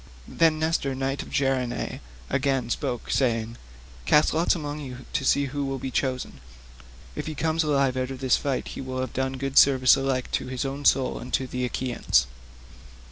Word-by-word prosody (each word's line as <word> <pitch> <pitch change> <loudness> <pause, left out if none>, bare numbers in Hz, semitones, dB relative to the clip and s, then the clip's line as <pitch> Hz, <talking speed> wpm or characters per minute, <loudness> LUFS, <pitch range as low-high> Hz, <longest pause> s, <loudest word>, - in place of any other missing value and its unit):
Then 165 -2 +3
Nestor 160 -4 0
knight 135 +1 -2
of - - -10
Gerene 135 -3 -1 0.3
again 135 -3 0
spoke, 120 +1 -3
saying: 115 -3 0 0.5
"Cast 150 - +4
lots 165 +3 +2
among 150 -2 -4
you 130 -3 -8
to - - 0
see 140 +1 +3
who 140 +1 -3
shall 135 - -2
be 130 0 -5
chosen. 130 - -2 0.8
If - - -4
he 155 - -4
come 160 +1 -1
alive 140 -4 +2
out 130 0 -1
of 135 - -5
this 130 -1 +2
fight 140 -3 -2
he - - -6
will 130 -1 -4
have 130 - -3
done 130 0 -1
good 135 +1 +3
service 130 -2 +6
alike 135 -2 -1
to - - -1
his 130 +1 -3
own 140 +1 -4
soul 130 -1 +3
and 125 - -8
to 130 - +1
the 125 0 -3
Achaeans." 120 - +1
135 Hz, 190 wpm, -25 LUFS, 130-140 Hz, 0.8 s, service